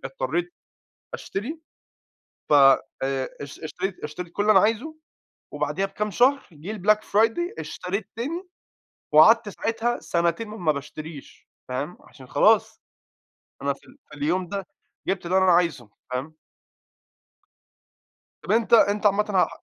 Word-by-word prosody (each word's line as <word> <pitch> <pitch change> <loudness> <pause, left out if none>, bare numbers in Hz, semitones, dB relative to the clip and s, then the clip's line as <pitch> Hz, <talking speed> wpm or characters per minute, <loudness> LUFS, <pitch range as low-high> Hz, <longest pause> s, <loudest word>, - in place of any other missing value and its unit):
اضطرِّيت 350 -7 -2 0.6
أشتري، 280 +12 -5 0.9
ف - - +3
آآ، 135 -1 +3
اشت 140 -1 -8
اشتريت 185 +3 -4
اشتريت 165 +3 -6
كل 205 - 0
اللي 215 - +5
أنا 190 - +7
عايزه، 230 +10 0 0.6
وبعديها 150 +6 -1
بكام 210 +2 -3
شهر 265 +6 +3
جه 160 +8 -7
الBlack 210 +3 +4
Friday، 225 +10 +2 0.2
اشتريت 185 +4 -4
تاني، 335 +10 -4 0.6
وقعدت 220 +8 +7
ساعتها 225 +3 -2
سنتين 170 +6 -1
ما 180 -8 0
باشتريش، 150 +1 -9 0.2
فاهم، 135 +7 -4
عشان 130 -2 -16
خلاص، - - +3 0.8
أنا 140 0 +1
في 135 - -16
ال 270 - -18
في 150 - -11
اليوم 170 +5 -1
ده 195 -1 -4 0.4
جبت 190 -2 -2
اللي 185 +2 +3
أنا 190 -1 +5
عايزه، 165 -10 +1 0.2
فاهم؟ 130 +5 -4 2.1
طّب - - -3
أنتَ 230 +1 +2
أنتَ 210 -1 +5
عامةً 205 +1 +4
ه 190 -3 +3
190 Hz, 130 wpm, -24 LUFS, 155-220 Hz, 2.1 s, أنا